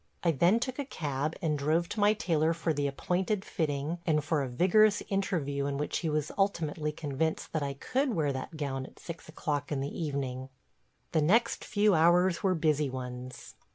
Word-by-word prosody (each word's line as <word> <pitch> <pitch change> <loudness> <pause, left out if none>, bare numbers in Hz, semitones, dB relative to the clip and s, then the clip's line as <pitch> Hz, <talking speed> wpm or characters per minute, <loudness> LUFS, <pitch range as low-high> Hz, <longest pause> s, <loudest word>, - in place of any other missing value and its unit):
I 170 - +4
then 175 - +3
took 255 +2 -3
a - - 0
cab 150 - -3
and 150 -3 +1
drove 160 +4 +1
to 215 - -4
my 205 +1 +5
tailor 165 -5 +1
for 165 -1 0
the 145 -1 0
appointed 185 +8 -1
fitting 155 +1 -2
and 155 -3 +1
for 155 -1 +1
a 135 - -2
vigorous 200 - +4
interview 155 -8 -1
in 140 -1 -2
which 150 - -1
he 165 - -1
was 150 0 -1
ultimately 160 -6 0
convinced 150 +1 -2
that 155 - 0
I 140 -1 -2
could 255 - -1
wear 145 -3 +1
that 130 +4 -6
gown 135 -3 -3
at - - -18
six 170 -2 -9
o'clock 145 -2 -3
in 145 - 0
the 140 +1 -4
evening. 135 -4 -3 0.6
The 160 - +2
next 225 +10 +3
few 210 -2 +3
hours 175 +2 +4
were 190 -2 +2
busy 150 -3 +1
ones. 125 -1 -7
155 Hz, 190 wpm, -30 LUFS, 140-180 Hz, 0.6 s, my